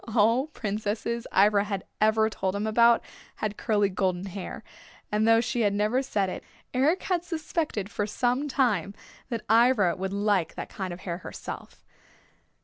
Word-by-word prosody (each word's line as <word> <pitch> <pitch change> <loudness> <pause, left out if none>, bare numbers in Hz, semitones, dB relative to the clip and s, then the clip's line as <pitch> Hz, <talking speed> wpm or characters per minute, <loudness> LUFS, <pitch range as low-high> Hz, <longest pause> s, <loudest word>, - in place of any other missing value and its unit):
All 230 +6 +4
princesses 220 -1 -3
Ivra 200 +1 +4
had 195 -2 -3 0.2
ever 220 0 +4
told 190 -3 -2
him 205 +1 -1
about 235 +2 +4 0.3
had 210 -1 -3
curly 205 -2 +1
golden 185 -1 -1
hair, 195 0 -7 0.5
and 210 +1 +2
though 225 0 +6
she 240 0 -1
had 205 -2 +2
never 215 +5 +2
said 210 -7 0
it, 185 - -5 0.3
Eric 290 +8 +2
had 355 -3 0
suspected 315 - -2
for 205 0 -2
some 250 +6 0
time 210 - +1 0.3
that 230 -4 -4
Ivra 225 -5 +4
would 190 +1 -3
like 200 -4 +1
that - - -6
kind 190 -2 -5
of 175 +1 -8
hair 175 -2 -4
herself. - - -8
215 Hz, 160 wpm, -27 LUFS, 200-235 Hz, 0.5 s, though